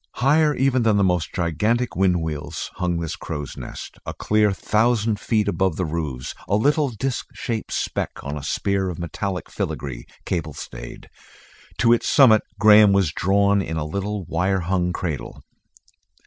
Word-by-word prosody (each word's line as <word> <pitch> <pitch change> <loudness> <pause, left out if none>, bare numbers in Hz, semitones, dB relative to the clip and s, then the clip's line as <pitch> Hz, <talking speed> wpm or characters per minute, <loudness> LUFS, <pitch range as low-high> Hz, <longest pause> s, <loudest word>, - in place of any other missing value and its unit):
Higher 150 +3 +3
even 130 -1 +2
than 110 -3 +3
the 100 - +3
most 90 -3 +1
gigantic, 105 +9 0
wind 90 -3 +2
wheels 75 -2 -5
hung 90 -2 0
this 80 -2 -3
crow's 75 -1 -6
nest, - - -8
a - - -6
clear 105 -1 +2
thousand 110 +2 +1
feet 110 -2 0
above 95 -3 +1
the 90 - -1
roofs, 75 -6 -4
a 100 - +2
little 145 +6 +2
disc 125 +2 -3
shaped 115 -2 -4
speck - - -2
on 70 +1 -4
a 75 - -5
spear 95 +6 -1
of 85 - -5
metallic 90 +2 -4
filigree, 65 -4 -4 0.2
cable 80 -4 -2
stayed. - - -9 0.7
To 115 0 +5
its 120 - +1
summit 115 -6 +6 0.2
Graham 105 -2 +7
was 95 -6 +2
drawn 100 +3 +2
in 80 -3 -4
a 75 - -2
little 100 +5 -3
wire 95 +4 0
hung 90 0 0
cradle. 85 -6 -5
95 Hz, 160 wpm, -22 LUFS, 85-110 Hz, 0.7 s, Graham